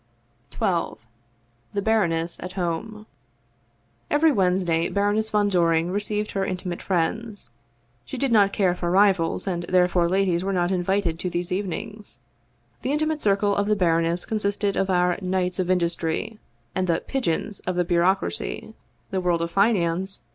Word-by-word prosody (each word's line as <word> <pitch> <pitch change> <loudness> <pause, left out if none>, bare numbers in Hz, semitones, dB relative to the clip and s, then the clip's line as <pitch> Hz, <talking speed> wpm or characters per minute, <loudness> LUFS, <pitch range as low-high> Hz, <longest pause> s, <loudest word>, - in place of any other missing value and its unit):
1 - - +1
XII - - -14 0.8
THE 200 - -1
BARONESS 170 -7 +1
AT 180 0 -7
HOME 195 +4 -3 1.0
EVERY 305 +2 +4
Wednesday 180 - +1
Baroness 205 +2 +1
von 210 -1 +2
Doring 170 -2 +2
received 210 +1 -2
her 195 - -1
in 185 -1 -2
timate 180 -1 -5
friends. 195 - -2 0.5
She 265 - -7
did 275 0 0
not 205 -3 +5
care 190 -3 +2
for 175 -1 -3
rivals, 190 -3 +3
and 180 -3 -2
therefore 180 -1 +3
ladies 185 -2 +1
were 195 - -1
not 175 0 +1
invited 180 -2 0
to 180 - -2
these 175 +1 -3
evenings. 205 - -4 0.6
The 265 - -1
intimate 310 +1 0
circle 200 0 +2
of 200 0 0
the 210 - +3
baroness 170 -2 +1
consisted 205 -2 -1
of 195 - 0
our 180 -1 +2
Knights 185 -1 -1
of 185 -1 0
Industry 175 +3 -1 0.3
and 185 0 -1
the 165 -1 +1
" - - -33
pigeons 215 -5 -2
" - - -28
of 185 - 0
the 180 0 +1
bureaucracy, 185 +5 0 0.4
the 190 -1 -1
world 175 -2 +1
of 170 - -4
finance 190 -2 +1
185 Hz, 160 wpm, -24 LUFS, 175-205 Hz, 1.0 s, not